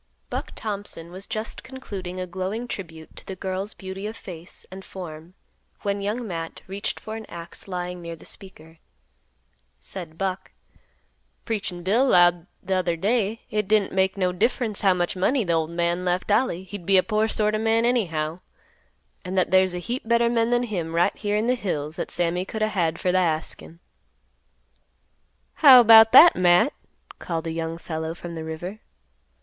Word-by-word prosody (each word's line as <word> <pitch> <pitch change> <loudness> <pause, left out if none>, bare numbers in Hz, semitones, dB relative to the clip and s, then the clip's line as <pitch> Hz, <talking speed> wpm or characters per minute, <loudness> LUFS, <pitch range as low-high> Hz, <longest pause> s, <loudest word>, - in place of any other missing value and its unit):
Buck - - -4
Thompson 200 -6 -5
was 190 +2 -7
just 215 +1 -4
concluding 195 -9 -7
a 185 - -2
glowing 190 +6 -4
tribute 160 -8 -8
to - - -9
the 190 - -5
girl's 190 +2 -4
beauty 190 +1 -6
of 220 +1 -7
face 175 -4 -9
and 190 +1 -9
form 170 -2 -9 0.5
when 200 0 -1
Young 215 +5 -2
Matt 165 -3 -6
reached 200 +3 -3
for 220 - -7
an 220 -1 -8
axe 170 +3 -9
lying 180 -1 -4
near 170 -1 -6
the 160 - -16
speaker. 160 -4 -10 1.0
Said 170 -4 -8
Buck, 190 0 -3 0.9
"Preachin' 195 -5 -3
Bill 215 +8 +3
'lowed 175 -4 +4 0.2
t'other 185 -2 0
day 215 +4 0
hit 210 -2 -1
didn't 210 -1 +2
make 190 +1 +1
no 185 -2 +1
difference 220 +2 0
how 190 -2 +4
much 175 0 -1
money 225 +6 +1
th' 170 - 0
ol' 160 -1 +1
man 170 +1 -1
left 180 +2 -1
Ollie 205 -5 +1
he'd 185 -1 -9
be 195 -1 +6
a 185 - +5
poor 215 0 +1
sort 215 -1 +1
of 215 - 0
a - - -3
man 225 +1 +3
anyhow; 170 -9 0 0.8
an' 185 0 -5
that 185 - +1
there's 185 -1 +4
a - - -2
heap 235 +7 -4
better 235 0 +3
men 230 -1 +2
than 240 0 +2
him 175 -8 -3
right 170 - +2
here 205 -1 -1
in 220 +2 0
th' 250 0 +1
hills 155 -6 -3
that - - -3
Sammy 175 +1 0
could 215 +3 -3
a' 215 - +2
had 170 -5 0
fer 180 - +1
th' 180 -4 +2
askin'." 160 +1 -9 1.8
"How 260 -5 +10
'bout 225 0 +9
that, 330 +6 +9
Matt?" 180 +8 +4 0.5
called 165 -2 -3
a 165 - -2
young 165 0 -3
fellow 160 -1 -4
from 175 0 -8
the 160 -1 -5
river. 175 +6 -6
190 Hz, 180 wpm, -24 LUFS, 170-215 Hz, 1.8 s, How